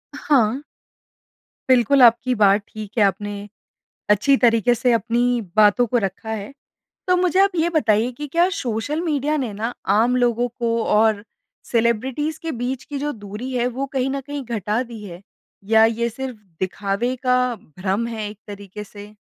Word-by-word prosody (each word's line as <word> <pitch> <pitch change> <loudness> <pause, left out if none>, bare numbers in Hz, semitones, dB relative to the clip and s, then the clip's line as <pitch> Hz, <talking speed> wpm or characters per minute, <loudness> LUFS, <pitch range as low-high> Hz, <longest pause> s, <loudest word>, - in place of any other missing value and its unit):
हाँ। 275 -4 +2 1.1
बिल्कुल 255 +2 +4
आपकी 245 +2 +5
बात 205 -1 +4
ठीक 215 -2 -9
है। 215 - +5
आपने 205 +2 -2 0.8
अच्छी 215 +7 +4
तरीके 240 0 +4
से 240 +1 +1
अपनी 230 +1 +1 0.3
बातों 215 +3 +5
को 240 - +4
रखा 195 +4 -5
है। 215 +3 -5 0.6
तो 365 - +4
मुझे 365 0 +1
आप 395 -1 +4
ये 330 +1 +2
बताइए 230 -6 +2
कि 295 - -3
क्या 350 +2 +5
सोशल 245 +6 -2
मीडिया 300 +1 0
ने 225 -4 -4
ना 225 +4 -3 0.3
आम 245 +3 +3
लोगों 245 0 +1
को 235 0 -3 0.2
और 215 -1 +3 0.5
सेलिब्रिटीज़ 245 +6 0
के 325 - -3
बीच 260 0 -3
की 285 -1 -6
जो 295 +1 -2
दूरी 215 +6 -6
है 245 -1 0
वो 275 - -1
कहीं 260 +1 +1
ना 275 0 -2
कहीं 285 0 -6
घटा 210 +5 -1
दी 215 -2 -8
है 175 -2 -9 0.5
या 220 0 +7 0.2
ये 235 - +2
सिर्फ़ 255 +1 -6 0.2
दिखावे 200 +6 -1
का 250 0 +4 0.4
भ्रम 195 +5 -1
है 220 -3 -4
एक 210 0 -11
तरीके 205 0 -8
से? 205 0 -12
235 Hz, 170 wpm, -21 LUFS, 210-265 Hz, 1.1 s, या